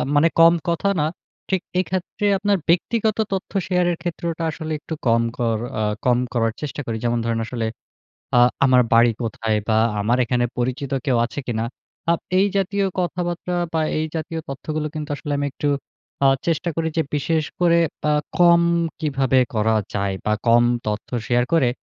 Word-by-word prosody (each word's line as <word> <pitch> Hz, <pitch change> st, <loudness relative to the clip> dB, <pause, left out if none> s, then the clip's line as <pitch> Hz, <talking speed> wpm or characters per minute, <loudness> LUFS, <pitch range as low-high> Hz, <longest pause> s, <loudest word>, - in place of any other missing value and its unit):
মানে 145 Hz, +3 st, +5 dB
কম 165 Hz, 0 st, +8 dB, 0.2 s
কথা 170 Hz, +4 st, +1 dB
না, 150 Hz, -, +2 dB, 0.4 s
ঠিক 190 Hz, -2 st, +1 dB, 0.2 s
এক্ষেত্রে 185 Hz, +3 st, -2 dB
আপনার 205 Hz, 0 st, +1 dB
ব্যক্তিগত 215 Hz, +5 st, +2 dB, 0.2 s
তথ্য 190 Hz, -, -3 dB, 0.2 s
শেয়ারের 180 Hz, -1 st, +2 dB
ক্ষেত্রটা 170 Hz, -1 st, -3 dB
আসলে 160 Hz, 0 st, -6 dB
একটু 160 Hz, -, -7 dB
কম 115 Hz, 0 st, +4 dB, 0.2 s
কর 115 Hz, -3 st, +1 dB, 0.2 s
আ -, -, 0 dB, 0.2 s
কম 125 Hz, -1 st, +4 dB, 0.2 s
করার 115 Hz, -2 st, +1 dB
চেষ্টা 150 Hz, -1 st, -4 dB
করি। 115 Hz, -1 st, -3 dB
যেমন 120 Hz, 0 st, +1 dB
ধরেন 115 Hz, -1 st, 0 dB
আসলে 115 Hz, -1 st, -3 dB, 0.7 s
আ -, -, +7 dB, 0.3 s
আমার 130 Hz, -2 st, +5 dB
বাড়ি 115 Hz, +1 st, +6 dB
কোথায়? 110 Hz, -1 st, -1 dB
বা 110 Hz, -, +3 dB, 0.2 s
আমার 115 Hz, +4 st, +2 dB
এখানে 120 Hz, +1 st, +1 dB
পরিচিত 130 Hz, +3 st, -2 dB
কেউ 130 Hz, -, +3 dB
আছে 120 Hz, -, -6 dB
কিনা। 115 Hz, -2 st, -1 dB, 0.5 s
আ -, -, +6 dB, 0.3 s
এই 195 Hz, -, +5 dB
জাতীয় 200 Hz, +1 st, +1 dB
কথাবার্তা 175 Hz, 0 st, -2 dB, 0.2 s
বা 160 Hz, -, +1 dB, 0.2 s
এই 155 Hz, -, 0 dB
জাতীয় 160 Hz, +1 st, -4 dB
তথ্যগুলো 150 Hz, +3 st, -3 dB
কিন্তু 155 Hz, -1 st, -5 dB
আসলে 145 Hz, -, -5 dB
আমি 145 Hz, -, 0 dB
একটু 145 Hz, -, -2 dB, 0.6 s
আ -, -, +7 dB, 0.2 s
চেষ্টা 170 Hz, +1 st, 0 dB
করি 165 Hz, -1 st, 0 dB
যে 160 Hz, -, +3 dB
বিশেষ 155 Hz, +2 st, +1 dB, 0.2 s
করে 170 Hz, -1 st, +4 dB, 0.3 s
আ -, -, +3 dB, 0.3 s
কম 170 Hz, -1 st, +6 dB, 0.4 s
কিভাবে 135 Hz, -4 st, +1 dB, 0.2 s
করা 110 Hz, 0 st, +2 dB, 0.2 s
যায় 100 Hz, -1 st, 0 dB
বা 105 Hz, -, +1 dB
কম 120 Hz, +1 st, +6 dB, 0.2 s
তথ্য 105 Hz, 0 st, -3 dB, 0.2 s
শেয়ার 120 Hz, 0 st, +2 dB
করে, 150 Hz, -7 st, +4 dB
150 Hz, 170 wpm, -22 LUFS, 120-170 Hz, 0.7 s, কম